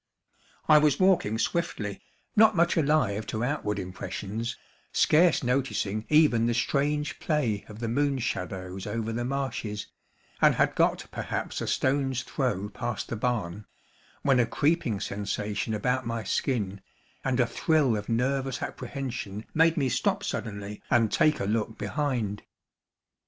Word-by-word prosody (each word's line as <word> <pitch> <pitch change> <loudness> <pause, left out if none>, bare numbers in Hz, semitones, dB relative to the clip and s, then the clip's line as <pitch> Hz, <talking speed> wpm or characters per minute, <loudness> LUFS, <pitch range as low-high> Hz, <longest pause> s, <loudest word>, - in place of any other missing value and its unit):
I 150 - +8
was 150 -2 +3
walking 185 - +3
swiftly, 115 - -2 0.3
not 220 0 +6
much 170 0 +3
alive 140 -10 +2
to 110 +1 -2
outward 125 -6 -1
impressions, 100 +4 -4 0.3
scarce 165 0 +4
noticing 120 -5 -1
even 150 -7 +5
the 120 - +1
strange 145 +4 0
play 125 -10 0
of 105 - -9
the 115 +1 -3
moon 140 +4 +1
shadows 95 -5 -4
over 115 -1 -2
the 120 +1 -2
marshes, 125 -6 -3 0.6
and - - +6
had - - +2
got - - +2
perhaps - - -3
a - - -3
stone's 135 -1 +1
throw 120 -8 -2
past 120 +2 -4
the - - -2
barn, 105 -4 -2 0.6
when 135 -3 +4
a 120 - +3
creeping 145 - +1
sensation 105 +2 -3
about 125 +4 0
my 115 -1 -2
skin, 100 -3 -1 0.4
and 130 -1 0
a 125 - +5
thrill 145 -1 +2
of 105 -1 -5
nervous 130 +2 0
apprehension 120 -7 -5
made 165 +1 +4
me 140 -3 +2
stop 190 - 0
suddenly 100 -1 -4
and 115 -3 +3
take 155 -2 +3
a - - -1
look 110 +1 -1
behind. 125 -9 -2
120 Hz, 140 wpm, -28 LUFS, 105-140 Hz, 0.6 s, I